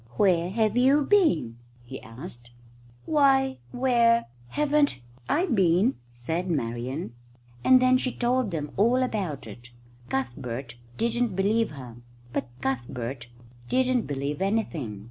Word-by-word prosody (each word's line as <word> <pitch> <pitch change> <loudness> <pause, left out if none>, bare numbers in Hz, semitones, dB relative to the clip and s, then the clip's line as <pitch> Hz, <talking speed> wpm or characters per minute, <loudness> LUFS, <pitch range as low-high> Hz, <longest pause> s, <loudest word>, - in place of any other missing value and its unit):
"Where 175 -3 +3
have 215 +2 +1
you 270 +4 +4
been?" 270 - +2 0.3
he 130 +2 -9
asked. 120 0 -9 0.6
"Why, 270 -3 +3
where 235 -2 +3 0.2
haven't 295 - +1 0.3
I 345 +5 +2
been?" 195 - +3 0.2
said 160 +10 -3
Marian, 125 0 -3 0.5
and 260 0 +7
then 255 0 +4
she 255 - -2
told 245 -1 0
them 150 -4 -4
all 240 +6 +3
about 195 - -3
it. 120 +3 -11 0.4
Cuthbert 125 -1 -4 0.2
didn't 235 -2 0
believe 210 +4 +2
her. 125 -5 -10 0.4
But - - -2
Cuthbert 120 -1 -3 0.4
didn't 255 -2 +1
believe 145 +2 -3
anything. 170 - -1
190 Hz, 120 wpm, -26 LUFS, -, 0.6 s, and